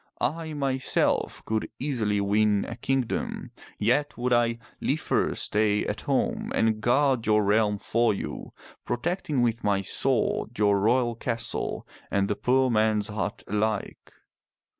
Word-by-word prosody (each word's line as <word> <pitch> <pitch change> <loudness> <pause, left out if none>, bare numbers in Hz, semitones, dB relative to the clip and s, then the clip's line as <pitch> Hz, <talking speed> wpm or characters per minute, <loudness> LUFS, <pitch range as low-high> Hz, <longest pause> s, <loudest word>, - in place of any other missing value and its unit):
I, 160 +3 -2
myself, 135 -3 0
could 110 0 -2
easily 115 -7 0
win 105 0 +2
a 115 - -5
kingdom, 130 0 -2 0.3
yet 145 0 +1
would 125 +1 0
I 120 -1 +2 0.2
liefer - - 0
stay 105 -1 +1
at - - -3
home - - 0
and 110 -1 +1
guard 130 0 +2
your 105 -1 +4
realm 105 0 +2
for 115 +3 +1
you, 100 - -5 0.3
protecting 150 -1 -1
with 115 -1 0
my 100 -1 +2
sword 120 +1 0
your 100 -1 +3
royal 120 +3 +2
castle 115 +1 -3 0.2
and 100 0 +1
the 105 - -1
poor 130 +2 +2
man's 110 -2 +2
hut 100 -4 -3
alike. 105 0 -2
115 Hz, 135 wpm, -26 LUFS, 105-125 Hz, 0.3 s, your